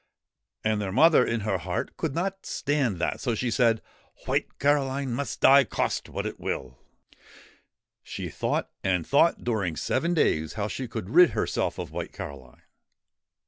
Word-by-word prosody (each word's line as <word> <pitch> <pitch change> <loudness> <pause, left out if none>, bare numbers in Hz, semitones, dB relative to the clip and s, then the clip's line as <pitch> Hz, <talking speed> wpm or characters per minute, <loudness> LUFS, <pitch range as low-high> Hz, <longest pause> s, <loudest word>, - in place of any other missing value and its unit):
And 110 -1 +1
their 95 -2 -3
mother, 155 - +6
in 115 -1 -1
her 100 -3 -1
heart, 90 +1 -4
could 155 -5 -3
not 195 +3 -2
stand 140 -8 0
that, 85 - -1
so 120 -4 0
she 120 +2 -1
said: 115 -2 +2 0.2
' - - -27
White - - -1
Caroline 140 -2 +1
must 140 +4 -4
die, 140 +1 +7
cost 110 - -2
what - - -4
it - - -5
will/' 65 -1 -4 1.2
She - - -6
thought - - -2
and 90 -3 +1
thought 165 +4 +3
during 100 -9 -1
seven 165 - 0
days 80 - +1
how 105 -1 -2
she 130 +4 -4
could 110 -3 -6
rid 175 +2 +7
herself - - -1
of - - -6
White - - -5
Caroline. 65 -3 -9
120 Hz, 165 wpm, -26 LUFS, 95-140 Hz, 1.2 s, die